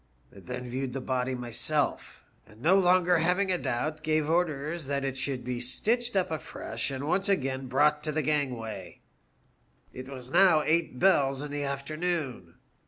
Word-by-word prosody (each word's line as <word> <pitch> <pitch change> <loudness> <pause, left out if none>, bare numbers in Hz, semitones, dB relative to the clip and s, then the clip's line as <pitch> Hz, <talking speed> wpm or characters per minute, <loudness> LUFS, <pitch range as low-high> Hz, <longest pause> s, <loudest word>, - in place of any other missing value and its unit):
I - - -11
then 125 +4 -6
viewed 130 +1 -3
the 135 - -2
body 130 0 -1
myself, 125 +5 -1 0.2
and 110 0 -18
no 170 +10 +4
longer 180 -1 +4
having 180 +4 +2
a 180 - 0
doubt 155 +6 -2
gave 155 0 +1
orders 160 -2 -1
that 140 0 -1
it 135 -1 -2
should 135 -2 -3
be 125 0 -3
stitched 230 - -1
up 185 -2 +1
afresh 155 -2 -3
and 135 0 -4
once 185 +6 +1
again 135 -7 0
brought 150 +3 +3
to 155 - 0
the 155 0 -1
gangway. 125 -10 -3 0.5
" - - -38
It 130 +1 -8
was 130 -2 -9
now 175 -4 +5
eight 160 -4 +1
bells 140 -6 +3
in 150 - -6
the 145 0 -2
afternoon. 140 - -3
145 Hz, 170 wpm, -28 LUFS, 130-165 Hz, 0.5 s, now